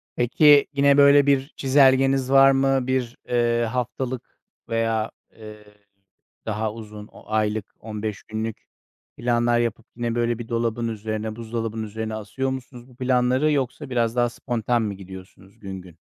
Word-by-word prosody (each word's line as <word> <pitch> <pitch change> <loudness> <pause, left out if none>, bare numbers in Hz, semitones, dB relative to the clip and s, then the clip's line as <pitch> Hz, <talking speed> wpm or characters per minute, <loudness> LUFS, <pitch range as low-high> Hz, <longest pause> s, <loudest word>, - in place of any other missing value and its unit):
Peki, 145 +4 +5
yine 140 0 +4
böyle 140 0 +7
bir 135 -1 +2
çizelgeniz 135 -1 +3
var 135 0 +7
mı? 135 -1 +1
Bir, 130 -2 -1
eee, 120 -1 +2
haftalık 125 0 -4 0.3
veya, 115 -1 0 0.2
eee, 105 -1 -12 0.8
daha 110 0 -2
uzun, 105 -2 -10
o - - -16
aylık, 110 -1 0
15 105 -1 -5
günlük 110 0 -4 0.6
planlar 120 0 +1
yapıp 115 -1 -2
yine 120 -1 -2
böyle 120 -1 0
bir 120 - -7
dolabın 115 0 -1
üzerine, 110 0 -4
buzdolabın 115 -1 -4
üzerine 110 +1 -5
asıyor 130 +5 -3
musunuz 125 -1 -8
bu 125 - -18
planları 130 +3 +2
yoksa 140 0 -2
biraz 120 -2 0
daha 120 -1 +2
spontan 120 -1 -1
mı 105 -2 -2
gidiyorsunuz 95 0 -13
gün 95 -2 -7
gün? 85 -3 -16
120 Hz, 145 wpm, -23 LUFS, 110-130 Hz, 0.8 s, böyle